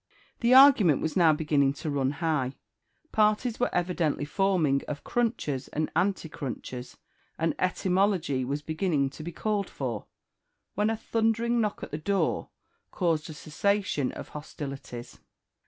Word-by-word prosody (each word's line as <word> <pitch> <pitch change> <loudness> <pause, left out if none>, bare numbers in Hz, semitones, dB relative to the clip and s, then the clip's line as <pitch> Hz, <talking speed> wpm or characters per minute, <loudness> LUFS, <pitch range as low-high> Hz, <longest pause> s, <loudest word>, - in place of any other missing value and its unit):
The 240 +1 +4
argument 245 - +7
was 160 - -2
now 170 -4 +6
beginning 150 -3 +2
to 150 +2 -4
run 135 -2 +1
high; 150 -5 -1 0.6
parties 215 +2 +2
were 245 - +2
evidently 175 -5 0
forming 160 -5 +2
of 145 -1 -5
crunchers 220 - -1
and 155 +1 -2
anticrunchers, 140 - -3 0.4
and 165 0 +1
etymology 185 -6 +1
was 140 +3 -3
beginning 155 -4 0
to 155 - -10
be 170 +3 -5
called 205 +2 -1
for, 120 -6 -4 0.7
when 210 +2 +1
a 225 - -1
thundering 230 +1 +1
knock 210 -2 -2
at - - -7
the 150 - -3
door 195 +5 0 0.4
caused 165 -3 0
a - - -6
cessation 155 -1 0
of - - -8
hostilities. 140 -5 -8
160 Hz, 140 wpm, -28 LUFS, 145-200 Hz, 0.7 s, argument